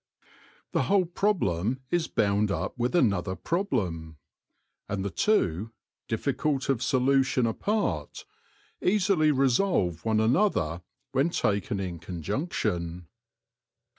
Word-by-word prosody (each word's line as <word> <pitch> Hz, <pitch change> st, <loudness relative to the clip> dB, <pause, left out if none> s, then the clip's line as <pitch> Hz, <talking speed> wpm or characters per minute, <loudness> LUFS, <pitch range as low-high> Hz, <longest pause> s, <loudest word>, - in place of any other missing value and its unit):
The -, -, +1 dB
whole 195 Hz, -2 st, +3 dB
problem 130 Hz, -, 0 dB
is 175 Hz, -2 st, +1 dB
bound 100 Hz, 0 st, +1 dB
up 100 Hz, -, -2 dB
with 125 Hz, +4 st, -1 dB
another 100 Hz, -, +2 dB
problem; 90 Hz, -, -2 dB, 0.7 s
and 100 Hz, -1 st, -2 dB
the 100 Hz, -, -2 dB
two, 105 Hz, -, +1 dB, 0.3 s
difficult 135 Hz, +4 st, -1 dB
of 135 Hz, -5 st, +1 dB
solution 130 Hz, -1 st, +2 dB
apart, 115 Hz, -, -2 dB, 0.6 s
easily 185 Hz, -5 st, +3 dB
resolve 130 Hz, -, +1 dB
one 110 Hz, -1 st, +1 dB
another 110 Hz, -, +1 dB, 0.3 s
when 135 Hz, +5 st, +2 dB
taken 100 Hz, -, 0 dB
in 90 Hz, -3 st, -4 dB
conjunction. 90 Hz, -, -3 dB
115 Hz, 105 wpm, -27 LUFS, -, 0.7 s, whole